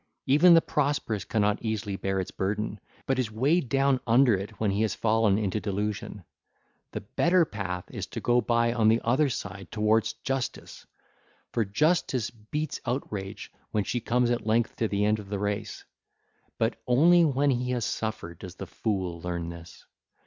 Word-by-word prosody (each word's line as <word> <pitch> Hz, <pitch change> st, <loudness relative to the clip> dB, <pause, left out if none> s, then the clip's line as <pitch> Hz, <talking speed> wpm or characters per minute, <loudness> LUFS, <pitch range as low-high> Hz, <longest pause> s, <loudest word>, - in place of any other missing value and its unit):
Even 170 Hz, +6 st, +6 dB
the 165 Hz, -, +6 dB
prosperous 140 Hz, -8 st, -1 dB
cannot 105 Hz, -2 st, +1 dB
easily 110 Hz, -3 st, -2 dB
bear 95 Hz, 0 st, -1 dB
its 95 Hz, -, -4 dB
burden, 105 Hz, +2 st, -2 dB, 0.3 s
but 135 Hz, -1 st, 0 dB
is 125 Hz, -4 st, 0 dB
weighed 130 Hz, +6 st, +1 dB
down 135 Hz, 0 st, +2 dB
under 120 Hz, +1 st, +5 dB
it 100 Hz, +1 st, -4 dB
when 105 Hz, -2 st, +1 dB
he 100 Hz, +2 st, 0 dB
has 110 Hz, -, 0 dB
fallen 110 Hz, -2 st, +2 dB
into 105 Hz, -1 st, -1 dB
delusion. 105 Hz, -1 st, -3 dB, 0.7 s
The -, -, -4 dB
better 170 Hz, -, +2 dB
path 95 Hz, -, -4 dB
is -, -, -5 dB
to -, -, -6 dB
go 120 Hz, 0 st, +2 dB
by 115 Hz, 0 st, +2 dB
on 115 Hz, -3 st, +2 dB
the 115 Hz, +1 st, +5 dB
other 135 Hz, +5 st, +2 dB
side 95 Hz, -6 st, -6 dB
towards 110 Hz, +1 st, +2 dB
justice; 135 Hz, -1 st, -4 dB, 0.6 s
for 115 Hz, -, +1 dB
Justice 130 Hz, -, +1 dB
beats 130 Hz, +7 st, -5 dB
Outrage 105 Hz, -6 st, -4 dB, 0.2 s
when 105 Hz, -, 0 dB
she 120 Hz, -, -2 dB
comes 120 Hz, +1 st, +1 dB
at 120 Hz, -2 st, -2 dB
length 115 Hz, +1 st, +1 dB
to 115 Hz, -, +1 dB
the 100 Hz, 0 st, 0 dB
end 105 Hz, +1 st, +2 dB
of 100 Hz, -2 st, -10 dB
the 100 Hz, -, -2 dB
race. 105 Hz, +1 st, -3 dB, 0.7 s
But 115 Hz, 0 st, -1 dB
only 170 Hz, +8 st, +6 dB
when 140 Hz, -2 st, +2 dB
he 125 Hz, 0 st, -1 dB
has 120 Hz, -3 st, -1 dB
suffered 110 Hz, -7 st, -4 dB
does 90 Hz, -2 st, -9 dB
the -, -, -7 dB
fool 95 Hz, -6 st, -3 dB
learn 85 Hz, -1 st, -3 dB
this. 85 Hz, 0 st, -11 dB
110 Hz, 175 wpm, -27 LUFS, 100-125 Hz, 0.7 s, Even